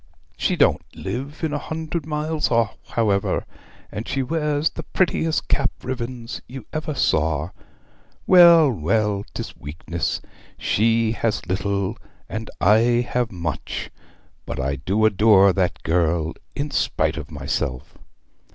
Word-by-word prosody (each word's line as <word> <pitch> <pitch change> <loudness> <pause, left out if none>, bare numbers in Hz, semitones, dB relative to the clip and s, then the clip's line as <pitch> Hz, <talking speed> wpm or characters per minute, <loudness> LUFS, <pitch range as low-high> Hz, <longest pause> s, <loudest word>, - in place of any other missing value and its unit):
She - - 0
don't - - +3
live 140 +6 -5
a 150 -2 0
hundred 160 0 -4
miles 155 0 -1
off, 115 -2 +2
however, 105 -4 0 0.5
and 110 - -5
she 135 -1 -1
wears 150 +1 0
the - - -6
prettiest 160 -1 0
cap 135 -1 +2
ribbons 125 -1 -5
you 130 -3 -9
ever 155 -1 -3
saw. 80 - +1 0.7
Well, 170 -5 +8
well, 105 +2 0
'tis - - -5
weakness! 80 +3 -3 0.4
She 115 +1 +2
has 115 -4 -1
little, 100 +3 -1 0.3
and 110 0 -5
I 120 +3 +4
have 125 -2 0
much; 85 -4 -4 0.6
but - - -4
I 70 +1 -1
do 100 +11 +1
adore 100 -2 +5
that 90 -2 -1
girl, 80 -1 +1 0.2
in 145 +1 -3
spite 80 0 +1
of 75 -3 -6
myself!' 70 -3 -3
115 Hz, 125 wpm, -22 LUFS, 90-145 Hz, 0.7 s, Well